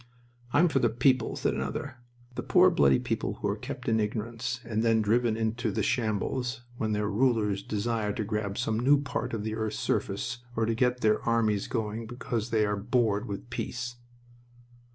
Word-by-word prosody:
"I'm 155 Hz, +7 st, +5 dB
for 145 Hz, -5 st, +2 dB
the 120 Hz, -, +3 dB
people," 125 Hz, +1 st, +2 dB
said -, -, 0 dB
another. 140 Hz, -3 st, -4 dB, 0.4 s
"The -, -, -3 dB
poor, -, -, +5 dB
bloody 70 Hz, -2 st, +4 dB
people, -, -, -2 dB
who -, -, -3 dB
are -, -, 0 dB
kept -, -, -7 dB
in 110 Hz, -1 st, +3 dB
ignorance 115 Hz, +3 st, -2 dB
and 110 Hz, -1 st, -1 dB
then 115 Hz, -1 st, +3 dB
driven 115 Hz, +1 st, +2 dB
into 115 Hz, +1 st, -1 dB
the 100 Hz, -, -1 dB
shambles 120 Hz, +1 st, -1 dB
when 110 Hz, -2 st, -1 dB
their 105 Hz, 0 st, 0 dB
rulers 105 Hz, -3 st, +1 dB
desire 110 Hz, +1 st, -1 dB
to 110 Hz, -, -2 dB
grab 105 Hz, -1 st, -2 dB
some 110 Hz, 0 st, 0 dB
new 140 Hz, +4 st, +5 dB
part 140 Hz, -, -3 dB
of 110 Hz, -3 st, -3 dB
the 110 Hz, 0 st, -2 dB
earth's 110 Hz, -1 st, -2 dB
surface 120 Hz, +5 st, -1 dB, 0.2 s
or 115 Hz, -, +1 dB
to 115 Hz, -, +1 dB
get 125 Hz, +2 st, +1 dB
their 110 Hz, -1 st, +3 dB
armies 110 Hz, -3 st, +1 dB
going 110 Hz, -1 st, -3 dB
because 120 Hz, -1 st, -3 dB
they 110 Hz, -2 st, +2 dB
are 105 Hz, 0 st, 0 dB
bored 110 Hz, -1 st, +1 dB
with 100 Hz, +3 st, -6 dB
peace." 125 Hz, 0 st, -4 dB
110 Hz, 185 wpm, -28 LUFS, 105-120 Hz, 0.4 s, I'm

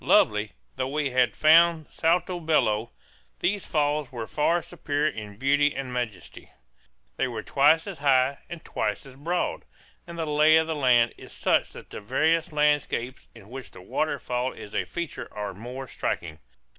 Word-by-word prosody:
Lovely 105 Hz, 0 st, +3 dB, 0.2 s
though 130 Hz, -, -1 dB
we 145 Hz, -1 st, -1 dB
had 125 Hz, -1 st, +2 dB
found 165 Hz, +1 st, +5 dB
Salto 175 Hz, +2 st, +1 dB
Bello, 120 Hz, -9 st, +1 dB, 0.5 s
these 200 Hz, +1 st, -1 dB
falls 150 Hz, -2 st, 0 dB
were 120 Hz, -3 st, -5 dB
far 165 Hz, +7 st, +1 dB
superior 155 Hz, -3 st, -1 dB
in 105 Hz, -4 st, -9 dB
beauty 145 Hz, +3 st, +2 dB
and 130 Hz, -2 st, -5 dB
majesty. 115 Hz, -6 st, -5 dB, 0.7 s
They -, -, +1 dB
are 115 Hz, -4 st, -4 dB
twice 150 Hz, +4 st, +4 dB
as 195 Hz, -6 st, -7 dB
high 135 Hz, -1 st, +3 dB
and 175 Hz, -2 st, -8 dB
twice 105 Hz, +3 st, -2 dB
as 135 Hz, -1 st, -13 dB
broad; 170 Hz, +6 st, -2 dB, 0.4 s
and 170 Hz, 0 st, -8 dB
the 165 Hz, -, -2 dB
lay 155 Hz, +1 st, +5 dB
of 160 Hz, -, +3 dB
the 160 Hz, -, -2 dB
land 125 Hz, -5 st, +3 dB
is -, -, -12 dB
such -, -, +1 dB
that -, -, -12 dB
the -, -, -7 dB
various 160 Hz, -, +1 dB
landscapes 145 Hz, -4 st, 0 dB
in 105 Hz, -3 st, -15 dB
which 135 Hz, 0 st, -8 dB
the -, -, -13 dB
waterfall 125 Hz, 0 st, -2 dB
is 105 Hz, -, -11 dB
a -, -, 0 dB
feature 170 Hz, -3 st, -6 dB
are 105 Hz, -1 st, -3 dB
more 125 Hz, +6 st, -8 dB
striking. 80 Hz, -8 st, -4 dB
140 Hz, 170 wpm, -26 LUFS, 120-160 Hz, 0.7 s, found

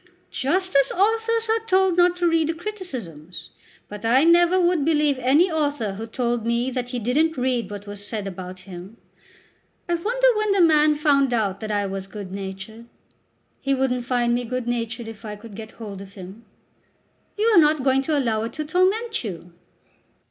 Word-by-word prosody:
"Just 370 Hz, +7 st, -1 dB
as 275 Hz, -1 st, +4 dB
authors 450 Hz, +3 st, +1 dB
are 445 Hz, 0 st, +1 dB
told 375 Hz, -2 st, +3 dB
not 355 Hz, 0 st, +3 dB
to 350 Hz, -1 st, +1 dB
read 325 Hz, -2 st, +2 dB
the 330 Hz, -, -1 dB
criticisms; 255 Hz, -, -7 dB, 0.4 s
but 210 Hz, +1 st, -9 dB
I 245 Hz, +5 st, +4 dB
never 345 Hz, +2 st, +5 dB
would 350 Hz, -4 st, +2 dB
believe 300 Hz, -3 st, +2 dB
any 290 Hz, +9 st, +3 dB
author 290 Hz, -9 st, -1 dB
who 220 Hz, +3 st, -6 dB
told 240 Hz, 0 st, -1 dB
me 235 Hz, +3 st, 0 dB
that 250 Hz, -1 st, -3 dB
he 250 Hz, -, -3 dB
didn't 285 Hz, +8 st, +1 dB
read 250 Hz, -2 st, -1 dB
what 205 Hz, 0 st, -8 dB
was 205 Hz, 0 st, -7 dB
said 210 Hz, -1 st, -4 dB
about 185 Hz, -1 st, -7 dB
him. 185 Hz, +3 st, -11 dB, 0.9 s
I 345 Hz, -, 0 dB
wonder 475 Hz, +9 st, +1 dB
when 425 Hz, -1 st, +1 dB
the 395 Hz, -, +3 dB
man 305 Hz, -2 st, +5 dB
found 280 Hz, -4 st, +2 dB
out 200 Hz, -4 st, -1 dB
that 215 Hz, -1 st, -5 dB
I 205 Hz, -1 st, 0 dB
was 195 Hz, 0 st, -5 dB
good 200 Hz, -2 st, -8 dB
natured. 195 Hz, +4 st, -7 dB, 0.8 s
He 275 Hz, 0 st, +1 dB
wouldn't 250 Hz, -2 st, -1 dB
find 240 Hz, -1 st, +1 dB
me 245 Hz, +1 st, 0 dB
good 250 Hz, 0 st, -4 dB
natured 235 Hz, -1 st, -3 dB
if 225 Hz, 0 st, -10 dB
I 210 Hz, -1 st, -6 dB
could 210 Hz, +1 st, -12 dB
get 220 Hz, +1 st, -9 dB
hold 205 Hz, -4 st, -8 dB
of 195 Hz, 0 st, -12 dB
him." 195 Hz, +4 st, -11 dB, 0.9 s
"You 425 Hz, -, +1 dB
are 350 Hz, -, +8 dB
not 300 Hz, -3 st, +3 dB
going 265 Hz, 0 st, +3 dB
to 295 Hz, +2 st, 0 dB
allow 230 Hz, -5 st, 0 dB
it 230 Hz, -, -6 dB
to 305 Hz, -, -4 dB
torment 385 Hz, -, +1 dB
you!" 175 Hz, -4 st, -7 dB
255 Hz, 190 wpm, -23 LUFS, 215-330 Hz, 0.9 s, are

